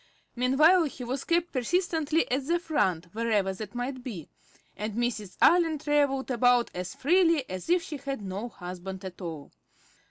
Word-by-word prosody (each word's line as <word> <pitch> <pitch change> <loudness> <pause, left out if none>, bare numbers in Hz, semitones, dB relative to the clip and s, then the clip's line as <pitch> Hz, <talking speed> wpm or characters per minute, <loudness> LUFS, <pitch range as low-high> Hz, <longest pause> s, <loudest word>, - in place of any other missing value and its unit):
Meanwhile, 305 +8 +4
he 270 -3 -6
was 260 +3 -4
kept 340 0 +1
persistently 320 +3 +1
"at 265 +2 0
the 340 +1 +3
front," 190 - 0
wherever 215 -4 +1
that 210 +3 -8
might 255 +2 -3
be, 195 - -7 0.5
and 210 0 -4
Mrs. 225 -5 -2
Allen 335 -3 +5
travelled 285 -3 +1
about 245 0 +3
as 180 -1 -5
freely 330 -2 +3
as 185 - -6
if 350 0 +3
she 300 - -6
had 275 -5 -5
no 200 +5 -4
husband 185 0 -8
at 185 0 -8
all. 160 -5 -7
250 Hz, 160 wpm, -28 LUFS, 200-305 Hz, 0.5 s, Allen